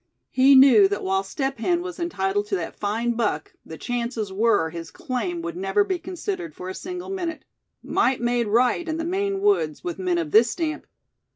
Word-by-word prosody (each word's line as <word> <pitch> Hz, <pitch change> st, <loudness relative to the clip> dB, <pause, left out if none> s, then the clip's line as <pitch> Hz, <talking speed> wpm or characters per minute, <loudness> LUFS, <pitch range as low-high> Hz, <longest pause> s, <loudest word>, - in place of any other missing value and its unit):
He 270 Hz, +2 st, +6 dB
knew 255 Hz, -7 st, +8 dB
that 205 Hz, +1 st, -3 dB
while 190 Hz, 0 st, +1 dB
Step 270 Hz, +6 st, -3 dB
Hen 345 Hz, +8 st, +1 dB
was 360 Hz, -1 st, -7 dB
entitled 205 Hz, -, -1 dB
to 200 Hz, -, -1 dB
that 170 Hz, -3 st, -4 dB
fine 220 Hz, +4 st, -1 dB
buck, 215 Hz, -10 st, -2 dB
the 160 Hz, -, -10 dB
chances 235 Hz, -3 st, -3 dB
were 205 Hz, -6 st, +2 dB
his 170 Hz, 0 st, -7 dB
claim 335 Hz, +7 st, -4 dB
would 340 Hz, 0 st, -4 dB
never 385 Hz, +3 st, +1 dB
be 375 Hz, -3 st, -2 dB
considered 365 Hz, -2 st, -5 dB
for 180 Hz, -, -7 dB
a -, -, -4 dB
single 360 Hz, -, -6 dB
minute. 345 Hz, -5 st, -4 dB, 0.4 s
Might 265 Hz, -, +1 dB
made 240 Hz, -1 st, 0 dB
right 245 Hz, +10 st, +2 dB
in 315 Hz, -, -1 dB
the 325 Hz, -, -3 dB
Maine 390 Hz, +2 st, -1 dB
woods, 395 Hz, -, +1 dB
with 175 Hz, +1 st, -4 dB
men 180 Hz, -2 st, 0 dB
of 165 Hz, -3 st, -2 dB
this 230 Hz, +2 st, +6 dB
stamp. 310 Hz, +5 st, -3 dB
245 Hz, 195 wpm, -24 LUFS, -, 0.4 s, knew